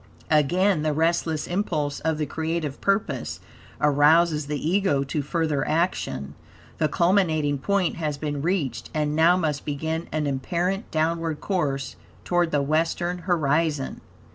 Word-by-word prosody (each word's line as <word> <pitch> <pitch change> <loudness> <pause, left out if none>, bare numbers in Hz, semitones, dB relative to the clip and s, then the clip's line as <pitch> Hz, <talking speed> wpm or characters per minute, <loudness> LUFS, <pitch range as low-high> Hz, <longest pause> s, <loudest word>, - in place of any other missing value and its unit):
Again 175 +4 +3
the 155 0 0
restless 160 0 0
impulse 155 -6 -1
of 160 -1 -1
the 150 - -1
creative 160 -1 -3
purpose 200 +2 -1 0.4
arouses 150 +1 +4
the 150 0 -2
Ego 165 -2 +1
to 140 +2 -2
further 150 -1 -1
action. 155 - -1 0.5
The 155 - +3
culminating 160 -4 +2
point 195 +2 0
has 150 -3 -2
been 145 -1 -3
reached, 165 -5 -1
and 150 -1 0
now 165 +3 +5
must 150 -5 -1
begin 160 +3 -3
an 155 -1 -1
apparent 175 - -1
downward 165 0 -1
course 140 -9 -2 0.3
toward 175 -1 +2
the 145 -3 +1
western 165 +4 0
horizon. 155 -3 +1
155 Hz, 135 wpm, -25 LUFS, 145-170 Hz, 0.5 s, now